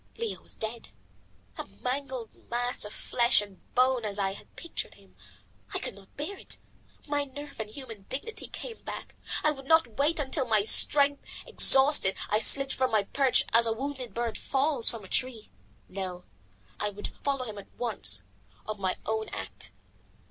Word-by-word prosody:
Leo 460 -1 -4
was - - -2
dead, 225 +1 -5 0.7
a - - -5 0.2
mangled 260 -2 -4 0.2
mass 245 +1 +1
of 210 - -8
flesh 240 +3 +3
and 200 -3 -6 0.2
bone 255 -1 +3
as 205 -2 -3
I 195 -1 -1
had - - -15
pictured 335 - -7
him. 95 -2 -23 0.6
I - - +3
could - - -4
not 195 0 -18
bear 350 +7 -5
it. - - -6 0.5
My 290 -1 -1
nerve 285 0 -10
and 215 -1 -4
human 225 -5 -9
dignity 285 +12 -4
came 470 -2 -8
back. - - -8 0.3
I 305 - +4
would 270 -2 -9
not 300 -8 +3
wait 305 +3 +2
until, 270 -1 -1
my 215 -2 +2
strength 285 +6 +5 0.2
exhausted, 265 -7 +7
I 210 - +3
slid 275 +4 +5
from 260 -1 0
my 215 -2 +2
perch 265 +5 +2
as 230 0 +5
a 225 - +1
wounded 260 0 -6
bird 235 -1 -3
falls 275 -2 +1
from 230 -3 -8
a - - -11
tree. 240 0 -3 0.4
No, 185 -2 -6 0.6
I 210 - -1
would 205 0 -7
follow 275 -2 -1
him 210 -3 -7
at 200 - -14
once, 205 - -2 0.4
of 215 -1 -5
my 185 -1 -1
own 220 0 -2
act. 95 -2 -7
240 Hz, 175 wpm, -28 LUFS, 210-275 Hz, 0.7 s, exhausted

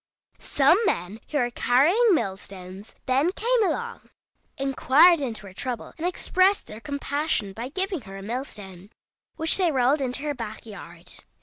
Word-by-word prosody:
Some 290 +7 +3
men 180 +6 -2
who 300 - -1
were 245 -3 0
carrying 345 - +3
mill 195 -9 -1
stones 190 +1 -11
then 275 +6 +2
came 475 +1 +2
along, 470 +6 -3 0.5
inquired 275 +5 +4
into 225 -6 -4
her 190 - -11
trouble, 245 +3 -5
and 335 +2 -2
expressed 370 +2 +2
their 215 - -10
compassion 285 -6 -2
by 235 +5 -6
giving 375 +1 -2
her 195 -2 -10
a 195 - -9
mill 240 +6 -3
stone, 190 -5 -11 0.5
which 320 0 +3
they 360 -4 +2
rolled 270 +2 +2
into 260 +1 -2
her 295 -1 -1
back 225 -4 -7
yard. 175 -5 -10
265 Hz, 165 wpm, -25 LUFS, 210-325 Hz, 0.5 s, inquired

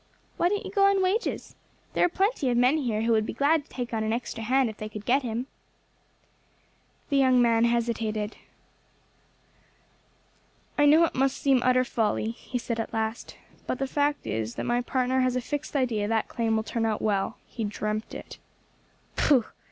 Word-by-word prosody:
"Why 350 - +3
didn't 410 +2 -2
you - - -6
go 395 -1 +4
on 395 -1 +3
wages? 395 +6 -1 0.4
There - - +2
are 355 - +4
plenty 385 - 0
of 240 - +1
men 250 +5 +4
here 225 -6 -1
who 230 - +1
would 220 -1 +3
be - - -4
glad 295 +2 +2
to - - -27
take 245 -2 -5
on 220 -1 0
an 220 - -1
extra 230 -1 -3
hand 260 +3 +2
if 215 -1 -7
they 215 - -6
could 210 -1 -8
get 265 +3 +3
him." 240 0 -3 1.6
The 280 - +2
young 260 -2 +4
man 230 -1 +4
hesitated. 225 -2 -1 2.4
"I 290 -1 +4
know 310 +3 +6
it - - -4
must 270 +1 +1
seem 270 -3 +3
utter 255 0 +3
folly," 220 -2 -1
he 245 +2 -6
said 235 -1 -3
at 225 - -4
last, 220 +1 -3 0.3
"but - - -1
the 270 - -1
fact 290 +2 0
is 110 +1 -3
my 240 0 0
partner 255 +1 0
has 255 -1 +1
a - - +1
fixed 290 +4 -5
idea 235 -6 +1
that 225 0 0
claim 225 -2 -1
will 220 - 0
turn 225 +1 -2
out 215 -1 -2
well; 200 -3 0
he 230 - -6
dreamt 215 +1 -3
it." - - -9 0.8
"Pooh!" 260 -6 +3
245 Hz, 190 wpm, -27 LUFS, 220-275 Hz, 2.4 s, know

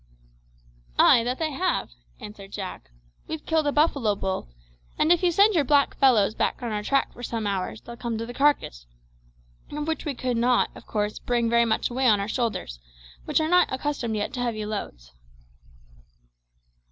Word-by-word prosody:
"Ay, 235 - +6
that 250 +2 -2
they 315 -1 -2
have," 355 - -1 0.3
answered 200 -2 -10
Jack. 190 - -7 0.4
"We've 315 -1 -6
killed 320 -2 +1
a - - +2
buffalo 280 -8 +2
bull, 190 - -3 0.5
and 310 - +3
if 350 - +4
you 360 - +3
send 405 +5 +5
your 325 -5 +3
black 280 +1 +3
fellows 230 -7 +4
back 245 - -1
on 235 - -3
our 210 -1 -2
track 275 +6 0
for - - -12
some 230 -3 -3
hours 200 +1 -3
they'll 235 0 -10
come 235 -2 -3
to 225 - -4
the 240 - -8
carcass, 260 - +1 0.8
of 295 +1 -4
which 320 - -2
we 295 -4 -3
could 250 -1 -2
not, 245 +1 +2
of - - -14
course, 210 -1 -2
bring 235 -1 0
very 235 0 +4
much 220 +1 0
away 260 +1 +1
on 210 -3 +5
our 200 - -2
shoulders, 220 - -3 0.5
which - - +1
are 315 - 0
not 360 +2 +4
accustomed 260 -4 -2
yet 205 -1 -3
to 255 - -5
heavy 230 -3 -2
loads." - - -6
240 Hz, 185 wpm, -25 LUFS, 210-290 Hz, 0.8 s, Ay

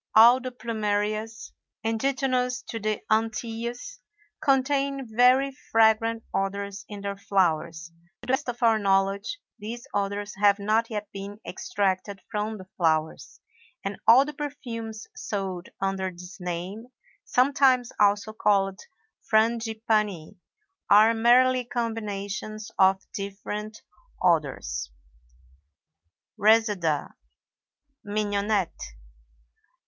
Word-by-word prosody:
All 235 +3 +8
the 255 - -4
Plumerias, 220 -1 -2 0.3
indigenous 250 +1 0
to 225 - -4
the 215 0 -2
Antilles, 225 +2 -2 0.4
contain 275 -1 +1
very 260 +3 +4 0.2
fragrant 225 0 +3
odors 200 0 -2
in 205 -1 -7
their 200 0 -3
flowers. 170 -4 0 0.3
To - - -8
the 255 - 0
best 265 -1 0
of 240 0 -4
our 225 -2 +4
knowledge, 195 - +1 0.2
these 230 +3 -7
odors 205 +1 -2
have 200 0 +4
not 220 +3 +1
yet 210 -2 -4
been 200 +1 -8
extracted 195 +1 -2
from 215 0 -2
the 185 - -11
flowers, 160 -2 -1 0.4
and 195 0 -4
all 255 +4 +8
the 300 - -6
perfumes 230 -7 -6
sold 190 -3 -4
under 195 -1 -1
this 180 +2 -11
name 180 +6 -5 0.4
(sometimes 255 -1 +3
also 205 +1 +3
called 195 -3 +1 0.5
Frangipanni) 220 -5 +1 0.5
are 215 +3 +7
merely 250 +3 +4
combinations 215 -3 -4
of 190 0 +4
different 210 +2 -6 0.4
odors. 145 - 0 1.5
RESEDA 205 -8 +2 0.9
(MIGNONETTE). 205 -2 -1
215 Hz, 100 wpm, -26 LUFS, 195-230 Hz, 1.5 s, All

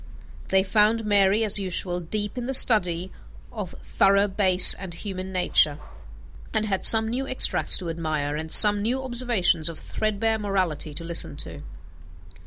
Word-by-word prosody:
They 190 0 0
found 215 +3 0
Mary, 205 +1 +1
as 210 -1 -1
usual, 180 -1 -4
deep 205 +6 -6
in 245 -1 -7
the 265 - 0
study 185 -7 +3 0.4
of 210 -6 -9
thorough 200 +1 0
bass 190 -2 +6
and 185 -3 -10
human 190 0 -8
nature; 165 -5 0 0.8
and 215 0 -1
had 195 -3 -4
some 220 -1 +4
new 255 +4 -5
extracts 260 - +2
to 180 - -8
admire 155 -3 -5
and 160 +1 -8
some 205 -1 +7
new 250 +5 -4
observations 240 -10 -2
of 165 - -11
threadbare 220 +1 -4
morality 185 -7 -4
to 165 - -9
listen 165 -4 -1
to. 145 - -12
195 Hz, 155 wpm, -22 LUFS, 175-215 Hz, 0.8 s, some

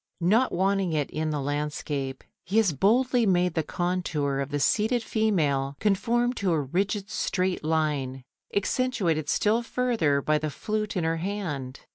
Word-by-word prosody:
Not 220 +9 +3
wanting 190 -1 +1
it 150 -2 -1
in 155 0 -2
the 150 -1 -1
landscape, 145 -1 -3 0.2
he 195 +5 -1
has 210 -7 +4
boldly 240 - +3
made 180 -2 +2
the 160 - +1
contour 160 -5 -1
of 140 0 -2
the 145 0 -2
seated 220 - +2
female 150 -12 0
conform 235 +5 +1
to 185 -3 +2
a 160 - +2
rigid 195 +8 -1
straight 185 -3 -1
line, 150 -5 -1 0.3
accentuated 200 - 0
still 220 +3 +2
further 230 - +1
by 150 +2 +1
the 155 0 -2
flute 215 +5 -3
in 175 - 0
her 165 0 0
hand. 160 -8 -4
175 Hz, 155 wpm, -26 LUFS, 145-210 Hz, 0.3 s, has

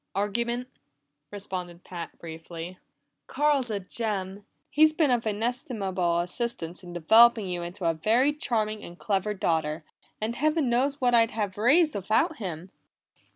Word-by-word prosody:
"Argument," 235 +5 -1 0.6
responded 180 -4 -6
Pat 175 -2 -8
briefly. 165 +2 -8 0.5
"Carl's 290 -4 +1
a 210 -2 -1
gem! 200 -1 -4 0.2
He's 310 +1 +5
been 310 -4 +2
of 235 -2 +1
inestimable 205 -6 -1
assistance 180 -2 -4
in 180 -2 -10
developing 220 +5 +5
you 175 -1 -3
into 175 +2 -6
a 165 - +3
very 230 - +2
charming 215 -7 -1
and 175 - -10
clever 205 +1 -1
daughter, 160 -3 -1 0.4
and 220 +2 -2
Heaven 305 -1 +1
knows 275 +4 +1
what 245 -1 +2
I'd 230 -1 +5
have 205 -4 -3
raised 290 +9 +4
without 220 - +1
him!" 180 - -6
210 Hz, 140 wpm, -27 LUFS, 180-240 Hz, 0.6 s, He's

